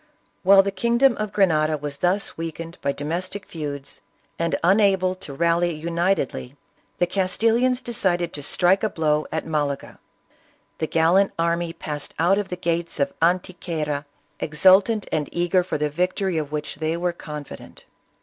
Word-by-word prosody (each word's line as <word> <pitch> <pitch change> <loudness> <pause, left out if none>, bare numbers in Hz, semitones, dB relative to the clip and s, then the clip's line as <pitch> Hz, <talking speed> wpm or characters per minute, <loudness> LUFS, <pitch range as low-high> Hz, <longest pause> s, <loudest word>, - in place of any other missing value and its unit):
While 195 +1 +7
the 200 - -1
kingdom 235 +6 +3
of 215 -1 -3
Grenada 155 -6 +2
was 145 -1 -6
thus 185 +5 0
weakened 165 +1 -6
by 140 - +1
domestic 180 +7 -4
feuds 145 -4 -7 0.4
and 170 0 0
unable 190 0 +3
to 185 -6 -9
rally 170 +3 +1
unitedly, 165 -4 -1 0.4
the 175 - +3
Castilians 230 +7 +1
decided 175 -7 -1
to 145 - -4
strike 180 +6 +2
a 215 - +1
blow 155 -4 0
at 160 0 -2
Malaga. 145 -3 -2 0.8
The 160 - -1
gallant 170 +5 +3
army 170 0 0
passed 150 -3 -6
out 180 +5 +3
of 205 - -4
the 180 - -3
gates 170 -1 -2
of 140 0 0
Antequera, 165 -4 -1 0.3
ex 150 0 -5
ultant 195 +3 +5
and 150 -2 -1
eager 175 +1 +2
for 180 - -3
the 150 0 -1
victory 180 +2 0
of 150 -2 -5
which 150 -1 -4
they 160 +2 -1
were 175 0 -1
confident. 150 -3 -9
170 Hz, 155 wpm, -23 LUFS, 155-190 Hz, 0.8 s, While